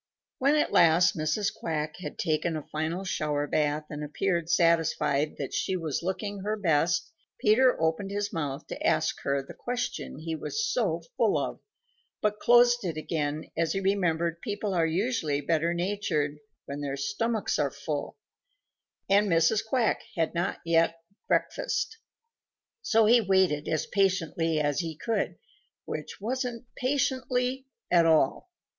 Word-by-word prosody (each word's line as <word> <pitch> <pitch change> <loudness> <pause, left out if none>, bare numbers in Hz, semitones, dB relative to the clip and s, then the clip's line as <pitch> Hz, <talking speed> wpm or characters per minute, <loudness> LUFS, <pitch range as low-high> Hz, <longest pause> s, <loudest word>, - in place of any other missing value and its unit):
When 280 +3 +3
at 300 - +2
last 170 +2 +5
Mrs. 155 +7 0
Quack 155 -2 -3
had 185 - -7
taken 160 0 0
a 155 - -6
final 160 +4 -2
shower 150 -6 -1
bath 150 0 0
and 150 0 -5
appeared 170 +2 -1
satisfied 165 -4 +2
that 140 - -5
she 190 - 0
was 160 -5 -2
looking 200 +3 -3
her 210 +3 -2
best, 165 -3 +1 0.3
Peter 250 +4 +4
opened 160 +5 0
his 205 0 -3
mouth 145 -4 -3
to - - -6
ask - - +1
her 140 0 0
the - - -11
questions 245 - -4
he 165 0 -3
was 440 - -2
so - - 0
full - - +3
of, - - -3 0.6
but 210 0 0
closed 240 0 +5
it 165 -4 -3
again 155 -1 -3
as 165 -1 0
he 195 - 0
remembered 170 -4 0
people 205 -3 -3
are 165 -2 +2
usually 165 - 0
better 165 +3 +1
natured 170 -5 -1 0.3
when 140 +1 -6
their 140 -1 -3
stomachs 215 +10 -1
are 145 -2 +2
full, 140 +1 -5 0.9
and 200 +1 +4
Mrs. 165 +5 +3
Quack 225 0 +1
had 165 -2 0
not 175 +2 -2
yet 165 0 +3 0.3
breakfasted. 475 -3 -1 0.8
So 225 - +3
he 235 +2 +6
waited 190 -7 +2
as 155 - 0
patiently 170 -5 +1
as 145 -2 0
he 165 -3 -4
could, 210 -4 -1 0.5
which 155 - -6
wasn't 245 +2 -3
patiently 255 -1 0 0.2
at 170 -2 +5
all. 160 - +2
170 Hz, 150 wpm, -28 LUFS, 155-210 Hz, 0.9 s, he